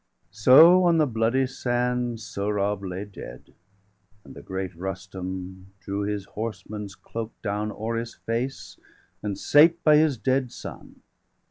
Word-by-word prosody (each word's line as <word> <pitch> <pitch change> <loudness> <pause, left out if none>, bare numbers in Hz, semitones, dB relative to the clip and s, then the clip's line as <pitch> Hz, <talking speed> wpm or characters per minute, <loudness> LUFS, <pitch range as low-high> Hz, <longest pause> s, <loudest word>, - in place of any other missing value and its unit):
So, 155 - +7
on 170 -1 +4
the 155 - +4
bloody 115 +1 +1
sand, 125 -2 -1
Sohrab 100 -1 -2
lay 95 +1 -5
dead; 80 -11 -11 0.7
And - - -13
the - - -11
great 95 -1 -5
Rustum 95 +1 -7
drew 100 +2 -4
his 100 -1 -3
horseman's 105 -2 -6
cloak 115 0 -7
Down 105 0 -2
o'er 115 +2 -3
his 115 0 -5
face, 120 +4 -4 0.4
and 100 -2 -3
sate 165 +4 +5
by 150 -1 +6
his 150 -4 +3
dead 130 +1 0
son. - - -10
110 Hz, 135 wpm, -25 LUFS, 100-125 Hz, 0.7 s, So